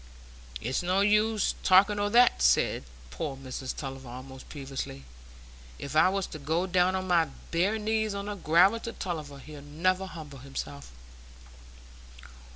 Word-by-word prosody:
"It's 125 Hz, +3 st, -1 dB
no 185 Hz, +2 st, +1 dB
use 210 Hz, +1 st, +2 dB
talking 200 Hz, +2 st, +5 dB
o' 205 Hz, 0 st, +1 dB
that," 240 Hz, +3 st, +5 dB
said -, -, +3 dB, 0.3 s
poor 135 Hz, -, -4 dB
Mrs 130 Hz, 0 st, -6 dB
Tulliver, 135 Hz, -2 st, -7 dB
almost 130 Hz, +2 st, -10 dB
peevishly. 135 Hz, -, -6 dB, 0.7 s
"If 140 Hz, +2 st, -7 dB
I 155 Hz, +4 st, +6 dB
was 195 Hz, 0 st, -1 dB
to 155 Hz, -, -6 dB
go 160 Hz, +5 st, 0 dB
down 185 Hz, 0 st, +2 dB
on 185 Hz, 0 st, -2 dB
my 170 Hz, -2 st, +4 dB, 0.3 s
bare 185 Hz, +6 st, +1 dB
knees 220 Hz, -1 st, -1 dB
on 200 Hz, 0 st, -4 dB
the 205 Hz, -, -3 dB
gravel 190 Hz, +4 st, +4 dB
to 230 Hz, 0 st, -6 dB
Tulliver, 155 Hz, -6 st, -5 dB
he'd 150 Hz, +1 st, -11 dB
never 185 Hz, +6 st, 0 dB
humble 150 Hz, -6 st, -9 dB
himself." 70 Hz, -, -7 dB
170 Hz, 150 wpm, -28 LUFS, 135-195 Hz, 0.7 s, I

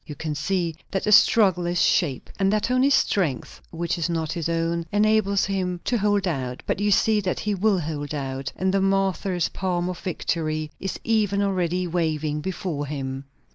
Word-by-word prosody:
You 150 Hz, -, -8 dB
can 155 Hz, +2 st, -4 dB
see 165 Hz, +2 st, -1 dB
that 195 Hz, -, -2 dB
the 210 Hz, -, +1 dB
struggle 190 Hz, -5 st, +5 dB
is 175 Hz, 0 st, 0 dB
sharp, 145 Hz, -8 st, +1 dB
and 195 Hz, 0 st, +3 dB
that 215 Hz, +3 st, 0 dB
only 255 Hz, +2 st, +4 dB
strength 180 Hz, -, 0 dB
which 170 Hz, +1 st, -3 dB
is 170 Hz, 0 st, -1 dB
not 160 Hz, -2 st, -1 dB
his 170 Hz, -2 st, -2 dB
own 165 Hz, 0 st, -1 dB
enables 210 Hz, -1 st, +2 dB
him 185 Hz, -2 st, -2 dB
to 245 Hz, -, +1 dB
hold 205 Hz, -1 st, +1 dB
out; 130 Hz, -6 st, -3 dB
but -, -, -1 dB
you 205 Hz, 0 st, +1 dB
see 210 Hz, +1 st, +3 dB
that 185 Hz, -2 st, -2 dB
he 210 Hz, -, -1 dB
will 200 Hz, +1 st, +2 dB
hold 150 Hz, -1 st, -4 dB
out, 135 Hz, -1 st, -4 dB
and 190 Hz, 0 st, 0 dB
the 195 Hz, -, +2 dB
martyr's 195 Hz, -2 st, +1 dB
palm 180 Hz, -1 st, -2 dB
of 180 Hz, -, -5 dB
victory 155 Hz, -4 st, -2 dB
is 195 Hz, -, -4 dB
even 205 Hz, -3 st, +1 dB
already 180 Hz, -2 st, 0 dB
waving 155 Hz, -3 st, -1 dB
before 175 Hz, -4 st, -3 dB
him." 135 Hz, -1 st, -5 dB
180 Hz, 185 wpm, -24 LUFS, 155-195 Hz, -, struggle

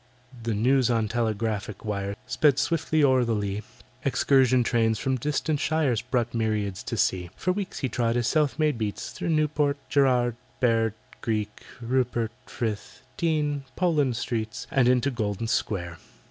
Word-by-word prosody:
The 115 Hz, -1 st, -1 dB
news 125 Hz, +3 st, +3 dB
on 115 Hz, -2 st, +1 dB
telegraphic 110 Hz, -2 st, -2 dB
wires 100 Hz, -1 st, -2 dB
Sped 145 Hz, -3 st, +3 dB
swiftly 155 Hz, 0 st, +1 dB
o'er 130 Hz, -2 st, +5 dB
the 115 Hz, -2 st, 0 dB
lea, 100 Hz, 0 st, -2 dB, 0.4 s
Excursion 130 Hz, -2 st, +3 dB
trains 115 Hz, -1 st, +2 dB
from 130 Hz, +4 st, 0 dB
distant 150 Hz, +3 st, -1 dB
shires 150 Hz, -7 st, +1 dB
Brought 120 Hz, -2 st, -1 dB
myriads 105 Hz, -4 st, -1 dB
to -, -, -3 dB
see. 90 Hz, -2 st, +1 dB
For 185 Hz, -, 0 dB
weeks 195 Hz, 0 st, -4 dB
he 135 Hz, -, +1 dB
trod 115 Hz, -2 st, 0 dB
his 120 Hz, -1 st, +1 dB
self 150 Hz, -2 st, +2 dB
made 150 Hz, -6 st, +1 dB
beats 105 Hz, -2 st, -3 dB
Through -, -, -4 dB
Newport 150 Hz, -2 st, +1 dB
Gerrard 125 Hz, -4 st, +3 dB, 0.2 s
Bear 115 Hz, -3 st, +2 dB, 0.3 s
Greek 105 Hz, -2 st, -2 dB, 0.2 s
Rupert 120 Hz, -2 st, 0 dB, 0.2 s
Frith 110 Hz, -3 st, -4 dB
Dean 150 Hz, -5 st, 0 dB
Poland 150 Hz, -9 st, +2 dB
Streets, 110 Hz, -3 st, -3 dB
And 135 Hz, -6 st, +3 dB
into 125 Hz, +2 st, +3 dB
Golden 110 Hz, -3 st, -2 dB
Square. 85 Hz, -7 st, -2 dB
120 Hz, 150 wpm, -26 LUFS, 110-140 Hz, 0.4 s, o'er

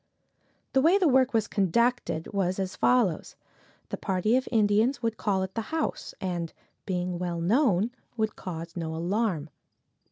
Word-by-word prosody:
The 265 Hz, -, +4 dB
way 335 Hz, +7 st, +5 dB
the 375 Hz, -4 st, +3 dB
work 260 Hz, -1 st, +4 dB
was 225 Hz, -2 st, +1 dB
conducted, 210 Hz, -2 st, 0 dB
was 185 Hz, -2 st, 0 dB
as 190 Hz, -1 st, -3 dB
follows: 235 Hz, -10 st, +2 dB, 0.5 s
The -, -, -3 dB
party 195 Hz, +4 st, +1 dB
of 260 Hz, -, +1 dB
Indians 225 Hz, +4 st, +2 dB
would 230 Hz, -1 st, 0 dB
call 195 Hz, -3 st, 0 dB
at 190 Hz, 0 st, -5 dB
the 225 Hz, -, -2 dB
house, 320 Hz, -1 st, -3 dB
and, 175 Hz, -4 st, -3 dB, 0.4 s
being 180 Hz, -2 st, -2 dB
well 175 Hz, -1 st, -2 dB
known, 215 Hz, -, +2 dB, 0.3 s
would 220 Hz, -1 st, 0 dB
cause 165 Hz, -2 st, -7 dB
no 160 Hz, -2 st, -3 dB
alarm. 175 Hz, -3 st, -1 dB
200 Hz, 155 wpm, -27 LUFS, 180-235 Hz, 0.5 s, way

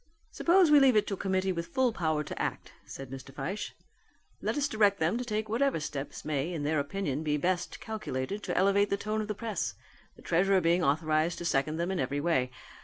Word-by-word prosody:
"Suppose 350 Hz, -2 st, +4 dB
we 295 Hz, -, +8 dB
leave 265 Hz, -3 st, +5 dB
it 210 Hz, -, +4 dB
to -, -, -3 dB
a -, -, -3 dB
committee 190 Hz, 0 st, 0 dB
with 170 Hz, -2 st, -3 dB
full 250 Hz, +6 st, +1 dB
power 155 Hz, -5 st, 0 dB
to -, -, -6 dB
act," -, -, -4 dB
said 135 Hz, -1 st, -8 dB
Mr. 135 Hz, 0 st, -8 dB
Fyshe. 190 Hz, +9 st, -4 dB, 0.7 s
"Let -, -, -1 dB
us 285 Hz, -1 st, +2 dB
direct 205 Hz, -5 st, +3 dB
them 160 Hz, +6 st, +1 dB
to -, -, -2 dB
take 215 Hz, -2 st, -2 dB
whatever 250 Hz, +1 st, +1 dB
steps 145 Hz, -2 st, -5 dB
may 150 Hz, +2 st, -1 dB
in 160 Hz, -4 st, -3 dB
their 150 Hz, +1 st, +1 dB
opinion 145 Hz, -1 st, -2 dB
be 150 Hz, -1 st, 0 dB
best 175 Hz, +3 st, -1 dB
calculated 195 Hz, -3 st, -4 dB
to -, -, -2 dB
elevate 200 Hz, +2 st, +3 dB
the 200 Hz, -, +1 dB
tone 215 Hz, +2 st, -2 dB
of 210 Hz, -, -4 dB
the 210 Hz, -, -3 dB
press, 200 Hz, -, -3 dB, 0.4 s
the -, -, -17 dB
treasurer 190 Hz, +3 st, +3 dB
being 175 Hz, +1 st, +2 dB
authorized 155 Hz, +3 st, +1 dB
to 175 Hz, -, -6 dB
second 155 Hz, 0 st, +1 dB
them 170 Hz, +3 st, -1 dB
in 190 Hz, -, -1 dB
every 140 Hz, +2 st, -1 dB
way. 145 Hz, -5 st, +1 dB
180 Hz, 220 wpm, -30 LUFS, 150-210 Hz, 0.7 s, we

